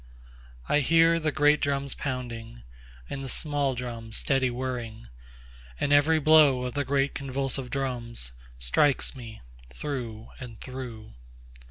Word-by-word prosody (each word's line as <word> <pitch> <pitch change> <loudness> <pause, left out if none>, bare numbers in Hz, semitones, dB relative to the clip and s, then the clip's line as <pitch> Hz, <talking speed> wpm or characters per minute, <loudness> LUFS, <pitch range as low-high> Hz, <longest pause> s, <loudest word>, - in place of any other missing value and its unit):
4I 145 - +3
hear 165 +3 +4
the 155 -1 0
great 150 0 +3
drums 140 -2 0
pounding, 120 - -5 0.4
And 135 - -5
the 135 - -6
small 145 -3 +1
drums 115 -2 -2
steady 135 -2 +2
whirring; 120 - -5 0.7
And 145 - +1
every 150 +3 +5
blow 150 -4 +5
of 125 - -4
the 145 - 0
great 140 0 0
convulsive 135 -1 -2
drums, 120 - -3 0.3
Strikes 65 - +2
me 115 -4 -10 0.3
through 115 - -6
and 120 -4 -9
through. 125 - -8
130 Hz, 130 wpm, -27 LUFS, 115-145 Hz, 0.7 s, every